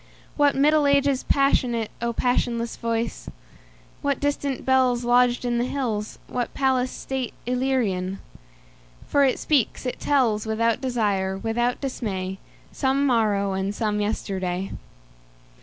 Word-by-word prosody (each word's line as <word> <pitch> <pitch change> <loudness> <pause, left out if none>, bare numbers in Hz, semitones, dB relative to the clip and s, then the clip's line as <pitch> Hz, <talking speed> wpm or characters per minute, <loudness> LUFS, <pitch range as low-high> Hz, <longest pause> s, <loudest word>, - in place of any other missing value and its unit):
What 290 -1 +3
Middle 295 +1 +4
Ages 280 -1 +3
passionate,O 240 -4 +1
passionless 235 -1 0
voice! 230 -1 -3 0.7
What 280 -1 0
distant 285 -2 -2
bellsLodged 245 -1 +3
in 240 -1 0
the 240 - +1
hills, 230 -6 -3
what 245 -1 -4
palace 260 -2 +2 0.2
stateIllyrian! 245 -7 -1 0.9
For 285 - +3
it 265 -2 +3
speaks, 275 -4 0
it 250 - -3
tells, 230 -7 +1
Without 225 +1 +1
desire, 205 -7 0
without 235 +4 -1
dismay, 195 -8 -3 0.3
Some 275 +1 +1
morrow 210 -6 +2
and 190 +1 -2
some 210 -2 0
yesterday. 190 -3 -2
240 Hz, 110 wpm, -24 LUFS, 210-265 Hz, 0.9 s, Middle